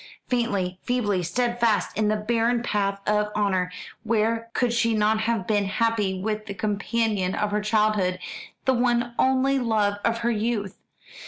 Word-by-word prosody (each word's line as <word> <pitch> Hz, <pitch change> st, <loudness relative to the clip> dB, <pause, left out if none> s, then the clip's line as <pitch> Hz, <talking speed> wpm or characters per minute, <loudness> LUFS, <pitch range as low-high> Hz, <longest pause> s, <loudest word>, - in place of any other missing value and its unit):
faintly, 200 Hz, -7 st, -1 dB
feebly 210 Hz, -7 st, 0 dB
steadfast 235 Hz, +3 st, 0 dB
in 215 Hz, +1 st, +1 dB
the 215 Hz, -, +2 dB
barren 230 Hz, +2 st, 0 dB
path 200 Hz, -3 st, 0 dB
of 210 Hz, 0 st, +1 dB
honour: 190 Hz, -3 st, +1 dB, 0.3 s
where 230 Hz, +1 st, 0 dB
could 245 Hz, -2 st, +1 dB
she 230 Hz, -1 st, +2 dB
not 215 Hz, +1 st, +2 dB
have 220 Hz, -3 st, 0 dB
been 205 Hz, -1 st, +1 dB
happy 205 Hz, -2 st, 0 dB
with 215 Hz, +2 st, -3 dB
the 200 Hz, -, -5 dB
companion 210 Hz, -2 st, -1 dB
of 210 Hz, -1 st, -1 dB
her 210 Hz, 0 st, 0 dB
childhood, 210 Hz, -3 st, +1 dB, 0.5 s
the 265 Hz, -, +4 dB
one 240 Hz, -1 st, +1 dB
only 265 Hz, +1 st, +3 dB
love 210 Hz, -4 st, +1 dB
of 230 Hz, 0 st, +1 dB
her 235 Hz, -, +3 dB
youth? 215 Hz, -3 st, -2 dB
215 Hz, 155 wpm, -25 LUFS, 205-235 Hz, 0.5 s, the